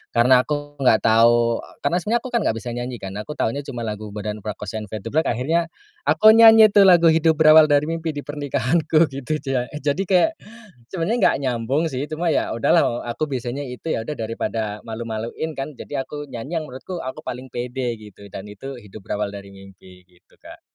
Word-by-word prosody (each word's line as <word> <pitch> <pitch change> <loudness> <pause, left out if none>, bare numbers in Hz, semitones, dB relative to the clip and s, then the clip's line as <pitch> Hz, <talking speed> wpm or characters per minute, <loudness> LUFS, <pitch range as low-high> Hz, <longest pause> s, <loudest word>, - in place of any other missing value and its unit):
karena 125 +2 +5
aku 145 -1 -4
enggak 125 -5 +3
tahu 115 +1 +4 0.2
karena 170 +5 +1
sebenarnya 225 +6 0
aku 255 - -6
kan 235 - +2
nggak 110 - 0
bisa 120 - -6
nyanyi 120 +1 -4
kan 95 -3 -7
aku 150 +8 -7
taunya 115 +6 -1
cuma 125 -4 -7
lagu 105 0 -5
Bondan 105 +1 -5
Prakoso 105 0 -6
and 105 - -8
Fade2Black 115 +10 -2
akhirnya, 160 +8 0 0.4
aku 215 0 +6
nyanyi 225 -1 +8
tuh 200 -1 +6
lagu 170 -3 +6
Hidup 160 0 +3
Berawal 155 0 +7
Dari 145 -1 +3
Mimpi 165 -2 -3
di 145 - -5
pernikahanku 150 +2 +1
gitu 140 +3 -3
jak 135 -4 -2 0.2
jadi 150 +6 0
kayak, 190 - +3 0.6
sebenarnya 190 +6 -1
nggak - - +4
nyambung 130 +4 -1
sih 135 -3 -4
cuma 165 +2 -1
ya - - 0
udahlah, 115 - +3
eee, 120 - -1
aku - - -3
bisanya 125 +2 -3
itu 130 +5 -4
ya 110 - -3
udah 150 - -5
daripada 110 -1 -4
malu-maluin 115 +6 -5
kan, 135 +2 -5
jadi 135 +1 -5
aku 145 +2 -8
nyanyi 135 +7 -4
yang 155 - -7
menurutku 150 +8 -7
aku 130 +4 -7
paling 125 +2 -6
pede 125 0 -4
gitu 105 -1 -14
dan 95 0 -8
itu 125 +6 -9
Hidup 105 -2 -12
Berawal 105 -1 -2
Dari 100 -1 -9
Mimpi 95 -1 -16
gitu 90 -1 -28
Kak. - - -14
130 Hz, 195 wpm, -21 LUFS, 110-155 Hz, 0.6 s, nyanyi